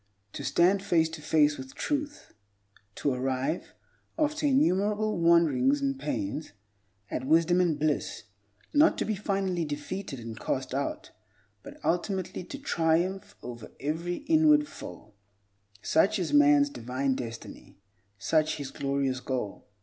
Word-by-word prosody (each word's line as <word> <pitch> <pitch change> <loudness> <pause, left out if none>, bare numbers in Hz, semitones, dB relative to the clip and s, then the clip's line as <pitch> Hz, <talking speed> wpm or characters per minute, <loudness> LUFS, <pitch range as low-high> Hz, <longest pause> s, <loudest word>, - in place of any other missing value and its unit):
To - - -6
stand 175 +8 +3
face 165 -4 +2
to 160 -1 -8
face 150 -1 +3
with 130 0 -9
truth; 295 0 -3 0.6
to 140 - 0
arrive, 130 +5 -2 0.4
after 305 -1 +1
innumerable 215 - +2
wanderings 150 -5 +4
and 135 -1 -1
pains, 145 -2 -3 0.6
at 130 - -3
wisdom 165 +4 +4
and 170 -4 +1
bliss; 150 -6 -1 0.5
not 300 +3 +5
to - - -1
be 215 - 0
finally 195 -3 -1
defeated 150 +1 -5
and 115 -1 -8
cast 130 -1 -2
out, 220 - -3 0.5
but 285 +1 -12
ultimately 185 +1 -1
to 280 - -7
triumph 180 - 0
over 120 -2 -8
every 170 - -3
inward 305 -1 +5
foe—such 100 - -3
is 170 -6 -2
man's 145 0 +5
divine 130 +2 -1
destiny, 115 -3 -8 0.4
such 155 +7 +1
his 140 -2 -6
glorious 140 -2 -1
goal. 125 -6 -4
155 Hz, 125 wpm, -28 LUFS, 130-190 Hz, 0.6 s, not